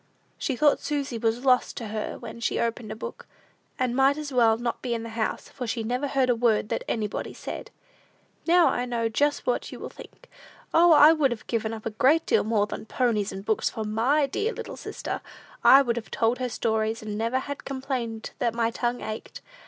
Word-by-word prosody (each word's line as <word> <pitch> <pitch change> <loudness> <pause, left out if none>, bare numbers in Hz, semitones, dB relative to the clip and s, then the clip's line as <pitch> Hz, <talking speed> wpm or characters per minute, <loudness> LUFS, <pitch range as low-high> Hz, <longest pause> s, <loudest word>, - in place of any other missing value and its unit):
She 270 - -1
thought 295 +3 +4
Susy 280 -5 -3
was 230 +3 0
lost 250 -1 +3
to 225 -3 -5
her 215 0 -4
when 235 0 -9
she 230 - -1
opened 230 -1 -2
a - - -4
book, 220 - -8 0.5
and 250 -1 0
might 270 +2 +4
as 300 -2 -5
well 230 -3 +4
not 240 0 -3
be 240 -2 -1
in 225 - -4
the 230 - -6
house, 225 -1 -2
for 250 -3 -6
she 225 0 -2
never 250 +5 -1
heard 270 -2 +1
a 245 - +3
word 225 -3 +2
that - - -2
anybody 210 -2 -3
said. - - -7 0.8
Now 345 0 +6
I 245 - -1
know 235 -2 -1
just 290 +6 +1
what - - -1
you - - -8
will - - -7
think: - - -14 0.5
"O, 340 +1 +6
I 305 0 +8
would 300 -4 +2
have 240 -3 -5
given 225 -2 -1
up 220 -1 -7
a 225 - -2
great 275 +9 +3
deal - - +3
more 215 -1 +2
than 215 - -7
ponies 215 -4 0
and 195 +1 -7
books 220 -1 +1
for 220 - -5
my 235 +8 +2
dear 420 - -2
little - - -7
sister! - - -5 0.4
I 275 +1 +8
would 240 -2 -1
have 230 - -5
told 230 +3 +1
her 250 -1 -1
stories, 220 0 -1
and 210 -1 -4
never 230 +4 0
have 285 +2 -5
complained 260 -5 -4
that 235 -4 0
my 230 -1 +1
'tongue 240 +1 -2
ached.' 215 0 -6
235 Hz, 215 wpm, -26 LUFS, 225-270 Hz, 0.8 s, I